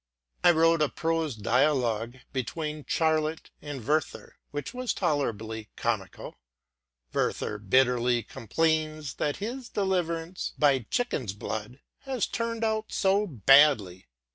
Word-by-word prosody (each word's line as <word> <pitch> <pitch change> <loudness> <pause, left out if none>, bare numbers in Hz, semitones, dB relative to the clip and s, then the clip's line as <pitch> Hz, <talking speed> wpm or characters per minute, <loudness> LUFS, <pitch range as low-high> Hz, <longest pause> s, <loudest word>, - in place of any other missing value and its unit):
I - - +7
wrote 165 -1 +4
a 150 - +3
prose 165 -4 -1
dialogue 120 0 +1 0.2
between 150 +4 -4
Charlotte 160 -1 0
and 140 -6 -7
Werther, 155 +1 -1
which 145 +11 -5
was 255 -3 -2
tolerably 115 - -2
comical: 110 -5 -3 0.7
Werther 105 - -1
bitterly 120 +2 +2
complains 155 +5 -1
that 145 - -1
his 240 +4 -5
deliverance 180 -3 -2
by 135 -6 +3
chickens' 140 - -1
blood 110 +4 -6 0.2
has 265 -4 -2
turned 230 -1 -3
out 220 -1 -1
so 200 +2 +2
badly. 130 - +4
150 Hz, 115 wpm, -28 LUFS, 120-170 Hz, 0.7 s, I